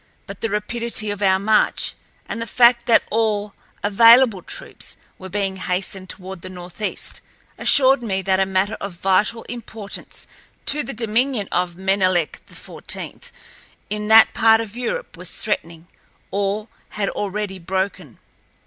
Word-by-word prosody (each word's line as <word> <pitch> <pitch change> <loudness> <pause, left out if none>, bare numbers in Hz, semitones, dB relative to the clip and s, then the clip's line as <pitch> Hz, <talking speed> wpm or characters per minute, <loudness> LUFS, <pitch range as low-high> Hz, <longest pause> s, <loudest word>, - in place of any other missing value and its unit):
But - - -10
the 225 - -1
rapidity 215 +1 0
of 205 0 -6
our 190 -1 +4
march 215 +3 +2 0.3
and 230 - -5
the 230 - -4
fact 240 +1 +4
that 230 - +5
all 210 -2 0 0.3
available 230 +1 +6
troops - - -4 0.2
were 190 - -9
being 195 0 -2
hastened 185 0 -3
toward 190 -1 -9
the 185 - -8
northeast 180 +3 -6 0.3
assured 270 -1 +4
me 195 -5 -2
that 190 0 +2
a 190 - +2
matter 190 +3 0
of 200 -1 -5
vital 195 +6 +1
importance 225 -3 -8 0.4
to 300 +2 +2
the 275 - -6
dominion 230 0 0
of 180 -1 -1
Menelek 185 -3 0
XIV - - -6 0.6
in 210 0 -2
that 220 0 +7
part 225 -1 +5
of 225 -1 -5
Europe 250 - -4
was - - -3
threatening 165 0 -3 0.4
or 200 +2 -1 0.3
had 200 -2 0
already 200 -1 -4
broken. 185 - -3
205 Hz, 140 wpm, -21 LUFS, 190-230 Hz, 0.6 s, that